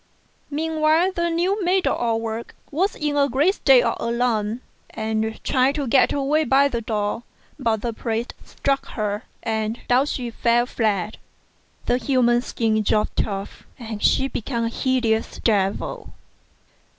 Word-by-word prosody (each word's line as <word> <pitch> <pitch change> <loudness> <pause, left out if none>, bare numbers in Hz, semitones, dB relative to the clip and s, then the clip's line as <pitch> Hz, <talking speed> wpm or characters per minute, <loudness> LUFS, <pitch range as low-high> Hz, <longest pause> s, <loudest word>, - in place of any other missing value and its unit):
Meanwhile 315 +3 +2
the 340 -2 -1
new 365 +5 0
maid 365 +1 +2
of - - +2
all 230 -2 0
work 225 0 -5 0.2
was 370 +8 0
in 295 -1 -2
a 280 -1 +3
great 290 +10 +3
state 265 -9 +5
of - - 0
alarm, 235 -1 0 0.3
and 220 0 -2
tried 265 0 +2
to 290 -2 -1
get 265 +2 +4
away 290 +2 +1
by 275 +1 +4
the 235 -3 -2
door; 210 0 -2 0.4
but 225 -5 0
the 235 -1 -2
priest 225 +1 -3
struck 275 0 -2
her 210 0 -2 0.2
and 220 0 -2
down 255 +3 +3
she 245 -4 -3
fell 235 +1 +2
flat, 215 -4 -1 0.7
the 245 - +2
human 240 -1 +2
skin 220 -3 0
dropped 210 0 0
off, 195 -1 -6
and 225 -4 -7
she 265 - +3
became 235 -2 -3
a 230 - 0
hideous 235 -3 0
devil. 200 -3 -1
240 Hz, 150 wpm, -22 LUFS, 220-280 Hz, 0.7 s, state